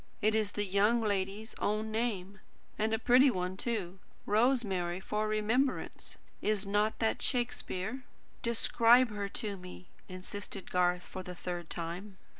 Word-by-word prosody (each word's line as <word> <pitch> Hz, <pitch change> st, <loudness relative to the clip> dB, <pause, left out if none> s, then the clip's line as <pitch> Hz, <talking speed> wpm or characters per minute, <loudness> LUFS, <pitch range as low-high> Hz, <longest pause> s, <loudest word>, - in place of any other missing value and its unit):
"It 215 Hz, +1 st, +2 dB
is 215 Hz, -2 st, +1 dB
the 205 Hz, -, -1 dB
young 205 Hz, +5 st, +3 dB
lady's 205 Hz, +1 st, -1 dB
own 215 Hz, +1 st, 0 dB
name, 205 Hz, -4 st, -2 dB, 0.4 s
and 220 Hz, +1 st, 0 dB
a 225 Hz, -, +2 dB
pretty 250 Hz, +4 st, +6 dB
one, 185 Hz, -4 st, -2 dB
too. 195 Hz, -4 st, -3 dB, 0.3 s
'Rosemary 205 Hz, -6 st, +2 dB
for 210 Hz, +2 st, -1 dB
remembrance.' 220 Hz, +6 st, 0 dB, 0.2 s
Is 210 Hz, -1 st, +1 dB
not 210 Hz, +2 st, +1 dB
that 225 Hz, -1 st, 0 dB
Shakespeare?" 245 Hz, -2 st, -1 dB, 0.4 s
"Describe 235 Hz, +1 st, +4 dB
her 205 Hz, -1 st, -3 dB
to 205 Hz, -1 st, -3 dB
me," 180 Hz, 0 st, -11 dB, 0.2 s
insisted 190 Hz, +1 st, -6 dB
Garth, 180 Hz, 0 st, +2 dB
for 185 Hz, -, -7 dB
the 180 Hz, -1 st, -8 dB
third 175 Hz, -1 st, -5 dB
time. 180 Hz, +4 st, -5 dB
205 Hz, 140 wpm, -32 LUFS, 185-225 Hz, 0.4 s, pretty